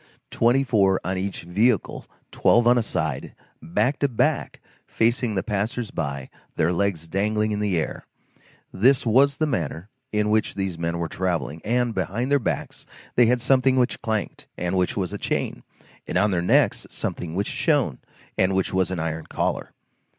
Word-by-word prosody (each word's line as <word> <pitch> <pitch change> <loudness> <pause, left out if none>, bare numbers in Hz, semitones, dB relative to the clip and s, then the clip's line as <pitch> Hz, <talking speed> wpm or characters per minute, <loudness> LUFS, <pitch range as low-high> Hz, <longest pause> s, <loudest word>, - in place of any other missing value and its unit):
Twenty 120 +4 +3
four 100 -7 +3
on 95 +1 -2
each 95 -1 -4
vehicle, 105 +6 0 0.2
twelve 120 +1 +3
on 120 +1 +6
a 120 - +3
side, 80 - -3 0.3
back 105 - 0
to 140 - +2
back, 120 -5 0 0.3
facing 115 -1 +1
the 95 - 0
passers 110 +1 -2
by, 70 -4 -4 0.2
their 80 +2 +2
legs 85 -3 -1
dangling 105 +4 0
in 105 - -1
the 100 -4 0
air,—this 120 - -2
was 135 +5 +4
the 155 - 0
manner 90 - -3 0.2
in 105 0 +1
which 110 0 +1
these 95 -3 -2
men 85 0 -1
were 85 -1 -2
travelling, 80 -4 -2
and 120 +1 +1
behind 100 +8 -2
their 145 - +4
backs 120 - -4 0.3
they 120 -1 +5
had 125 +1 +2
something 130 +1 +3
which 125 -1 +1
clanked, 110 -3 -3
and 90 +1 -2
which 90 +1 0
was 95 -3 -2
a - - -4
chain, - - -2 0.5
and - - -1
on 105 +2 +3
their 90 -2 +1
necks 90 - +2
something 85 -1 -4
which 100 +2 0
shone, 145 - +1 0.4
and 95 +1 +3
which 95 0 0
was 95 -1 +1
an 95 - -3
iron 80 -1 -3
collar. - - -2
100 Hz, 170 wpm, -24 LUFS, 90-120 Hz, 0.5 s, on